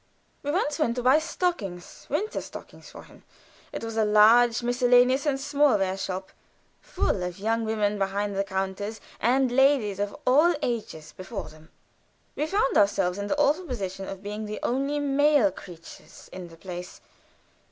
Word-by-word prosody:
We 290 - -5
once 300 -1 -1
went 235 -6 +1
to 245 - -3
buy 260 +5 +5
stockings 225 - -4
winter 400 +10 -2
stockings - - -11
for - - -12
him; - - -18 0.5
it - - -6
was 225 0 -5
a 220 - +3
large 225 +3 +5
miscellaneous 245 +3 +3
and 280 -2 +1
smallware 270 -9 +2
shop, 190 -1 -5 0.5
full 185 - -1
of 180 -1 -4
young 225 +3 -1
women 210 -2 0
behind 200 +1 -1
the 195 - +1
counters 195 +2 -4 0.2
and 255 +2 +2
ladies 250 -6 +3
of 205 0 -2
all 305 +7 +4
ages 210 -10 -4
before 195 +1 -7
them. 155 +1 -17 0.7
We 300 - -1
found 390 -5 +2
ourselves 195 -2 +1
in 200 - -3
the 290 - -1
awful 300 +5 +2
position 195 - -5
of 195 0 -8
being 210 +1 -5
the 210 - -5
only 275 +4 -1
male 285 -5 +3
creatures 170 -2 -13
in 185 -1 -7
the 165 -1 -15
place. 180 0 -8
220 Hz, 165 wpm, -26 LUFS, 195-270 Hz, 0.7 s, buy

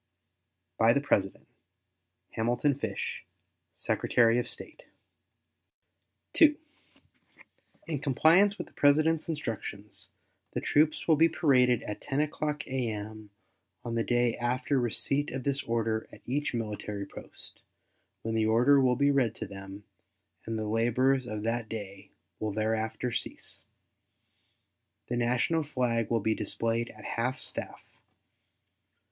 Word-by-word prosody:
By 115 +1 +6
the 140 - +3
President: 100 -9 0 0.8
HAMILTON 120 +5 +1
FISH, 105 -5 -3 0.5
Secretary 115 0 +2
of 120 - -3
State. - - -9 1.6
II. 300 -2 +7 1.3
In 155 -4 -3
compliance 165 +9 +4
with - - -5
the - - -21
President's 155 +3 +3
instructions, 110 -8 -4 0.4
the - - -1
troops 155 +1 +2
will 160 -2 +5
be 165 +2 +5
paraded 125 -7 +3
at 105 - -6
10 140 0 -2
o'clock 150 0 -1
a.m. 110 -4 -4 0.6
on 120 - -3
the 115 0 +1
day 120 -1 +2
after 125 +4 -1
the 135 - +4
receipt 140 +5 0
of 130 0 -5
this 140 +1 0
order 115 -1 -1
at - - -14
each 140 +2 -1
military 105 -2 -4
post, - - -12 0.6
when 115 - -2
the 110 -1 +2
order 125 +6 +5
will 125 -1 +3
be 140 +2 +3
read 125 -5 +2
to 110 - -5
them, 95 0 -9 0.6
and 115 0 -2
the 110 - -2
labors 120 +4 +2
of 105 -1 -4
that 115 0 -1
day 100 -3 -7 0.3
will 110 -1 -2
thereafter 110 +3 -1
cease. - - -4 1.5
The 120 - -1
national 125 +7 +1
flag 125 -6 -1
will 115 -2 +1
be 110 +2 +2
displayed 115 +1 0
at 110 0 -13
half 125 +3 -2
staff. - - -5
120 Hz, 130 wpm, -29 LUFS, 110-140 Hz, 1.6 s, II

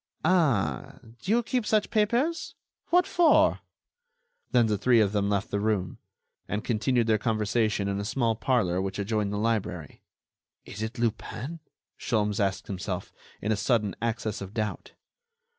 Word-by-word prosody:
"Ah! 135 - +1 0.2
do - - -8
you 235 +3 +3
keep 250 +1 -1
such 215 0 +1
papers? 240 +10 +1 0.3
What 360 +1 +4
for?" 340 -3 +4 0.9
Then 120 -2 +4
the 105 -1 +1
three 125 +1 +4
of 105 -3 +3
them 100 -1 0
left 100 -1 -1
the 100 - 0
room, 100 -4 -1 0.5
and 105 +1 -2
continued 120 +1 +1
their 110 -1 +2
conversation 110 -1 0
in 100 0 -1
a - - -2
small 115 +1 0
parlor 105 -7 +1
which 95 +1 -3
adjoined 105 0 -1
the 105 - -2
library. 100 -8 -2 0.6
"Is 105 - -8
it 110 +3 -4
Lupin?" 120 +6 -3 0.4
Sholmes 105 -3 0
asked 100 -2 0
himself, 95 -1 -5 0.3
in 110 - 0
a - - +3
sudden 105 -2 +1
access 115 -3 -2
of 100 +2 -8
doubt. 105 -2 -3
110 Hz, 155 wpm, -27 LUFS, 100-125 Hz, 0.9 s, What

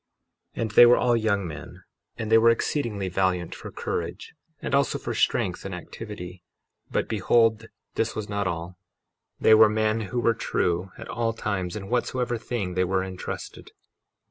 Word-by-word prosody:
53:20 - - -4
And 110 - -3
they 120 - +9
were 120 - +6
all 120 -1 +3
young 100 -4 0
men, 75 -4 -9 0.3
and 110 -1 -4
they 115 - +8
were 115 +1 +6
exceedingly 115 -4 0
valiant 90 -1 0
for - - -8
courage, 85 +3 -4 0.3
and - - -5
also 140 0 +2
for - - -4
strength - - 0
and - - -5
activity; 90 -5 -8 0.5
but - - -1
behold, 115 +1 +2 0.3
this 115 0 -1
was 110 -1 -4
not 100 -2 -1
all—they 90 +5 -2
were 110 0 +8
men 110 +1 +1
who 125 - -1
were 115 -1 +3
true 90 -4 -1
at - - -9
all 115 -1 -1
times 95 -4 -3
in 100 -2 -6
whatsoever 120 +1 -1
thing 105 -6 -3
they 90 +1 +1
were 95 +1 0
entrusted. 95 -1 -7
105 Hz, 170 wpm, -25 LUFS, 95-115 Hz, 0.5 s, they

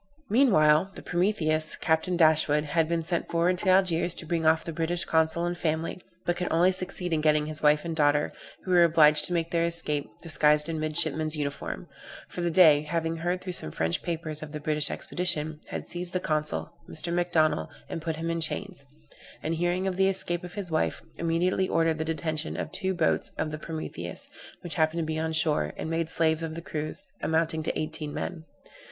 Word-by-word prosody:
Meanwhile, 190 - +4
the - - -9
Prometheus, 160 -4 0
Captain 160 +2 0
Dashwood, 155 -2 +4
had 155 +1 0
been 170 -1 0
sent 170 +1 0
forward 170 +2 +1
to 190 - 0
Algiers 180 -2 +3
to - - -6
bring 165 -1 0
off 160 0 +3
the 165 - -6
British 170 +2 -1
consul 160 +1 +1
and 175 0 -2
family; 165 +1 -2 0.2
but 175 - +1
could 180 - -3
only 175 +3 +4
succeed 185 -1 -1
in 155 - +1
getting 150 -1 +3
his 155 0 -3
wife 150 +1 +3
and 165 -1 -3
daughter, 145 -1 +2 0.3
who 185 - -4
were 175 -1 +6
obliged 155 -2 +7
to 180 - -1
make 170 -1 -1
their 170 -1 +1
escape, 150 -6 -2
disguised 150 -2 +3
in 165 -1 -3
midshipmen's 155 0 +2
uniform; 140 - -4 0.4
for 175 - -5
the 175 - 0
Dey, 160 -4 +6
having 165 +1 -2
heard 175 +2 -2
through 185 -1 -4
some 80 - -1
French 80 +2 -1
papers 160 -3 -4
of 155 -1 -8
the 150 - -4
British 150 0 +3
expedition, 160 -3 -2
had - - -6
seized 175 0 -3
the 185 - +1
consul, 155 -3 -2 0.2
Mr. 170 +2 -3
Macdonnell, 160 - +1 0.2
and 165 - -5
put 160 -1 -3
him 165 +1 -3
in 165 0 -2
chains; 180 0 -3 0.6
and, 160 - -1
hearing 175 +3 0
of 190 -1 -2
the 190 0 +4
escape 175 -2 -1
of 180 0 -9
his 195 -5 -4
wife, 155 - -1 0.2
immediately 175 +3 +1
ordered 165 -1 +1
the 160 - -1
detention 160 -1 -3
of - - -4
two 190 0 -2
boats 165 -3 +1
of 155 - -2
the 155 - -5
Prometheus, 155 - -5 0.3
which 175 - -6
happened 160 0 +1
to - - -2
be 155 0 -2
on 160 0 -1
shore, 160 -1 +1
and 160 - -4
made 165 0 -1
slaves 160 -1 +2
of 160 -1 -4
the 165 - -6
crews, 155 -1 -5 0.2
amounting 160 0 0
to 155 - -2
eighteen 155 -1 -3
men. 160 +1 -5
165 Hz, 205 wpm, -27 LUFS, 155-175 Hz, 0.6 s, obliged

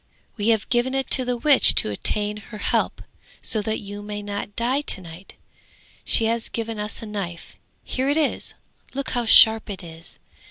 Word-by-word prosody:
_] - - -42 0.3
'We 205 -1 -2
have 220 -2 +2
given 250 +2 +1
it 270 0 -2
to 260 - +3
the 250 -1 -1
witch 280 +3 +5
to 105 - +3
obtain 210 - 0
her 210 +1 -10
help, - - -1 0.4
so 220 -3 +1
that 220 +1 -2
you 205 0 -8
may 205 0 -6
not 205 0 -5
die 255 +4 0
to 295 - -2
night! 170 +1 -12 0.7
She 225 - +2
has 230 0 0
given 225 -1 -4
us 210 +2 -3
a - - -5
knife; 195 -5 -6 0.3
here 260 +2 -2
it 290 - +2
is, 310 -3 -1 0.4
look 275 -1 -3
how 245 -1 0
sharp 220 -1 +7
it 195 -3 -6
is! 165 0 -9
220 Hz, 195 wpm, -23 LUFS, 205-240 Hz, 0.7 s, sharp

